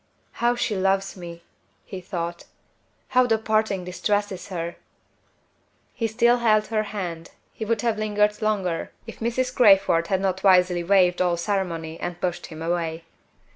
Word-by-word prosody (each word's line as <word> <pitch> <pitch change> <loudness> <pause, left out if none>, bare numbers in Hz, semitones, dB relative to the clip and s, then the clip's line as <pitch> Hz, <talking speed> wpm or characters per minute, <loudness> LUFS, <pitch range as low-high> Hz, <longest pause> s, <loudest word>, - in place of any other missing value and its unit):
"How 240 +1 +3
she 230 -3 -1
loves 195 +1 0
me!" 170 -2 -9 0.4
he 190 -3 -7
thought. 170 -2 -5 0.6
"How 255 -1 +4
the 225 -2 +3
parting 215 -4 0
distresses 195 +1 -2
her!" 170 -3 -5 1.2
He 225 - -1
still 235 +2 +3
held 215 -3 +3
her 220 -1 +1
hand; 175 -5 -5 0.2
he 220 - -5
would 225 -1 0
have 230 -3 0
lingered 210 0 +1
longer, 195 -6 -1
if 225 - -10
Mrs. 250 +2 -1
Crayford 195 -7 +5
had 190 +1 +1
not 190 -1 -1
wisely 180 -2 +4
waived 180 -1 +3
all 175 -1 +2
ceremony 170 -4 -3
and 175 -1 -5
pushed 175 -1 -3
him 160 0 -8
away. 165 -1 -2
195 Hz, 150 wpm, -24 LUFS, 175-215 Hz, 1.2 s, Crayford